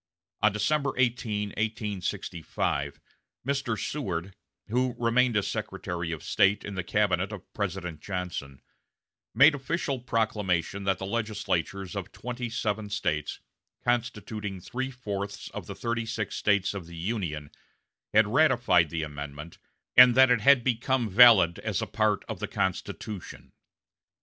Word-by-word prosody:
On 110 - +5
December 140 +6 0
18, 115 -5 0
1865, 100 - -3 0.5
Mr. 135 -5 -1
Seward, 95 - -3 0.4
who 125 +2 +1
remained 120 0 +2
as 100 - 0
Secretary 85 -1 -4
of 80 -3 -5
State 100 +2 +3
in 105 - -5
the 95 -2 -3
cabinet 95 -1 +1
of 100 -3 -10
President 90 -5 -3
Johnson, 90 -8 -5 0.7
made 140 +6 +8
official 140 -1 -2
proclamation 105 -6 -1
that 95 -2 +2
the 95 - -5
legislatures 100 -4 -2
of 95 -2 -5
twenty 120 0 -5
seven 105 -2 -2
States, 85 -7 -2 0.4
constituting 110 -4 -2
three 130 +8 -4
fourths 100 -6 -5
of - - -7
the - - -6
thirty 115 -1 -2
six 110 -3 -3
States 100 -2 +2
of 95 -5 -7
the 85 0 -10
Union, 80 -6 -3 0.6
had 110 +1 +5
ratified 120 - +3
the 80 0 -2
amendment, 75 +1 -7 0.4
and 125 -1 +9
that 130 -1 +7
it 120 -3 +3
had 140 -1 +6
become 125 -1 0
valid 95 -6 +7
as - - -2
a - - -1
part - - 0
of - - -5
the - - -3
Constitution. 95 0 -4
105 Hz, 135 wpm, -28 LUFS, 90-120 Hz, 0.7 s, and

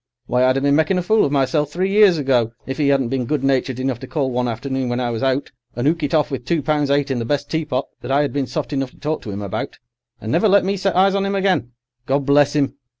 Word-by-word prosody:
Why, 125 +1 +1
I'd 130 +1 +3
a - - -1
been 140 0 +3
making 160 +5 +2
a 180 - -1
fool 215 +4 +3
of 140 - -2
myself 145 +1 +1
three 185 +4 -1
years 200 -4 +5
ago 125 -5 +1
if 135 +2 -5
'e 140 -2 +3
'adn't 135 -4 +1
been 130 -3 -1
good 150 -1 -1
natured 130 -2 0
enough 130 -2 -2
to 130 - -9
call 135 -3 -1
one 125 0 -1
afternoon 130 +2 -3
when 120 +1 -1
I 120 -1 -1
was 115 - -4
out, 135 +1 0 0.2
and 120 +3 -1
'ook 165 +2 +1
it 145 +2 0
off 150 -1 +1
with 130 -2 -4
two 160 +2 -1
pounds 150 -1 0
eight 140 0 +1
in 130 - -1
the - - -2
best 140 +5 -2
teapot 150 -5 -1 0.2
that 120 - -7
I 140 +2 +3
'ad 140 -4 -3
been 140 -2 -1
soft 145 -6 -4
enough 135 -2 -1
to - - -23
talk 155 +1 -2
to 105 - -7
'im 100 +1 -5
about: 100 - -5 0.4
and 110 - -5
never 220 - +3
let 200 -1 +4
me 195 +1 0
set 195 0 -1
eyes 190 +1 +4
on 200 0 0
'im 200 - -1
again. 190 -11 0 0.3
God 140 +1 0
bless 145 +1 +3
'im! 140 -2 0
140 Hz, 285 wpm, -20 LUFS, 130-155 Hz, 0.4 s, years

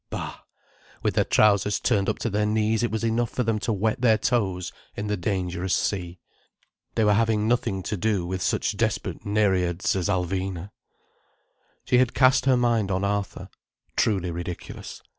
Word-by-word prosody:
Bah, - - -5 0.6
with - - +1
their - - +3
trousers 105 -1 +3
turned 100 -6 +1
up - - -1
to 115 - -2
their 105 +1 +1
knees 110 +1 +1
it 120 - +1
was 110 0 -3
enough 115 0 +1
for 125 - -1
them 110 -2 0
to 115 - -2
wet 110 +4 0
their 115 -3 +5
toes 100 -6 0 0.2
in 105 - -4
the 105 0 0
dangerous 90 -1 -1
sea. 90 -3 -2 0.8
They 110 - +2
were 105 -1 +4
having 110 0 +2
nothing 100 -5 0
to 105 - -2
do 100 -2 0
with 95 +1 -3
such - - 0
desperate - - -2
nereids 95 -4 +1
as 95 0 -1
Alvina. 95 0 -2 1.1
She 125 - +3
had 125 -2 +2
cast 130 0 +4
her 130 -2 +4
mind 115 -4 +1
on 95 0 0
Arthur. 100 0 -2 0.5
Truly 95 -5 +1
ridiculous. 85 +1 -7
105 Hz, 170 wpm, -25 LUFS, 95-110 Hz, 1.1 s, their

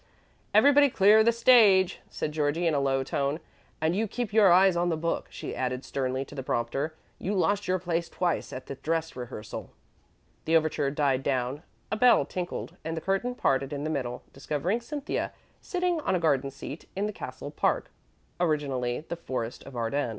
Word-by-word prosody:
"Everybody 285 0 +6
clear 215 0 +6
the 235 - +5
stage," 225 -6 +5
said 150 - -3
Georgie, 150 +3 0
in 165 - +3
a 145 - +2
low 135 -1 +1
tone, 140 +3 -1 0.4
"and 160 +3 +1
you 220 +3 0
keep 235 0 -4
your 210 -4 +6
eyes 185 +1 +6
on 175 +1 +1
the 165 - 0
book," 165 +1 -2
she - - -6
added 125 0 -2
sternly 130 0 -2
to - - -13
the 140 - -4
prompter; 135 +5 -2 0.2
"you 200 +3 -2
lost 205 +2 +1
your 185 0 +2
place 170 -1 -2
twice 175 -2 -1
at 130 - -7
the - - -6
dress 165 +3 -2
rehearsal." 120 -4 -7 0.8
The 165 +1 +5
overture 155 -3 0
died 140 -2 +1
down; 130 +1 -1 0.3
a 215 - 0
bell 240 - +5
tinkled, 180 +3 -5
and 160 0 -4
the - - -3
curtain 195 +8 -1
parted 135 - +1
in 145 0 -4
the 155 - -2
middle, 125 -4 -3
discovering 150 - -2
Cynthia 290 +4 -3 0.3
sitting 360 -3 -1
on 190 - 0
a - - +1
garden 140 -4 +1
seat 140 +3 -9
in 195 +2 0
the 210 - -3
castle 130 -3 -7
park - - 0 0.5
(originally 140 -7 0
the - - -3
Forest 125 -7 -5
of 135 - -10
Arden). 120 +3 -1
160 Hz, 185 wpm, -28 LUFS, 135-195 Hz, 0.8 s, Everybody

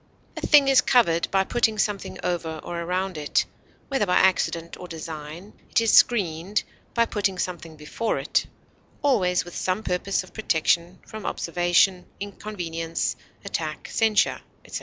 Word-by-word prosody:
A - - -6
thing 290 -3 +7
is 270 -1 +6
covered 170 -11 +3
by 195 0 +2
putting 220 +1 +1
something 205 -1 -1
over 165 -3 -2
or 170 - -5
around 180 0 -2
it, 150 - +1 0.4
whether 270 -7 0
by 180 - +2
accident 170 -3 +2
or 180 - -9
design; 160 +3 -8 0.2
it - - +3
is 230 -1 +2
screened 190 -3 +3 0.3
by 235 -1 +4
putting 200 -4 -1
something 170 -3 -4
before 155 +9 -2
it, - - 0 0.6
always 185 -12 +2
with 175 - -10
some 185 +4 -1
purpose 185 +1 -1
of 185 - -16
protection 170 -3 +1
from 215 -1 -8
observation, 175 +2 +2
inconvenience, 175 -5 -3 0.3
attack, 160 -6 -4
censure, 220 -3 +2 0.2
etc. - - -5
180 Hz, 145 wpm, -25 LUFS, 170-210 Hz, 0.6 s, thing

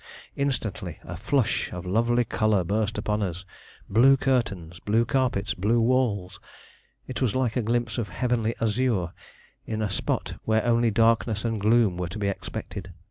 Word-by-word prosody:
Instantly 110 - -2
a 90 - -7
flush 125 - 0
of 90 0 -6
lovely 120 +5 +2
color 110 -3 +1
burst 105 +4 -1
upon 105 0 -1
us. 90 -2 -3 0.4
Blue 130 +6 +5
curtains, 100 -11 -1
blue 115 +3 +2
carpets, 115 -7 0
blue 105 +6 +1
walls. 110 -6 +1 0.7
It 130 -1 -5
was 125 -4 +1
like 130 -3 0
a 125 - +2
glimpse 120 0 -1
of 105 -4 -3
heavenly 115 +4 0
azure 110 -6 0 0.5
in 110 -1 -2
a 105 -3 -1
spot 95 - -2
where 110 +1 +1
only 120 -1 +3
darkness 115 0 +2
and 115 -3 -1
gloom 110 -3 +3
were 90 -1 -3
to 90 - -6
be 100 -1 0
expected. 95 0 -6
110 Hz, 160 wpm, -26 LUFS, 100-120 Hz, 0.7 s, Blue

